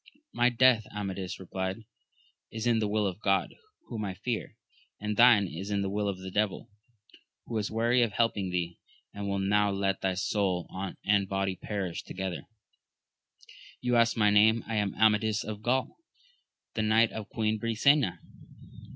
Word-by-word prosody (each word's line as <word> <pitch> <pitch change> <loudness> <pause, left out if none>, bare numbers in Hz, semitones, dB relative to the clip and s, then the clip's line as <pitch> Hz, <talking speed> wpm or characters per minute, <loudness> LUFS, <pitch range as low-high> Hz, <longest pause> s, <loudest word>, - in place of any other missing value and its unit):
My 120 +1 +3
death, 125 -2 +4
Amadis 95 -3 -5
replied, 95 +3 -4 0.6
is 110 +1 -5
in 120 -2 +3
the 110 - 0
will 105 0 0
of 95 0 -3
God, 100 -2 +1 0.3
whom 110 -3 -5
I 95 -2 -4
fear; 110 +4 -4 0.4
and 105 0 -3
thine. 115 -3 +6
is 90 +4 -6
in 100 -1 0
the 95 - -2
will 105 0 -1
of 95 - -3
the 95 0 -8
devil, 105 0 -1 0.7
who 115 - -6
is 105 - -2
weary 115 +3 +2
of 115 -4 +1
helping 105 -4 0
thee, 85 -1 -3 0.3
and 100 -1 -4
will 100 - -1
now 100 +1 +2
let 95 -1 -1
thy 95 -1 0
soul 95 -1 -1 0.4
and 100 -1 +2
body 95 -1 -1
perish 95 -3 -4
to - - -9
gether. 95 -1 -4 1.3
You 125 -1 0
ask 115 0 +3
my 105 -2 +4
name: 110 +2 +4
I 115 - -3
am 105 -2 -1
Amadis 110 0 +2
of 105 -1 -6
Gaul, 130 +4 0 0.8
the 110 - -1
knight 110 +1 +3
of 110 -2 -7
Queen 110 -1 -1
Brisena. 115 - +2
105 Hz, 170 wpm, -29 LUFS, 95-110 Hz, 1.3 s, thine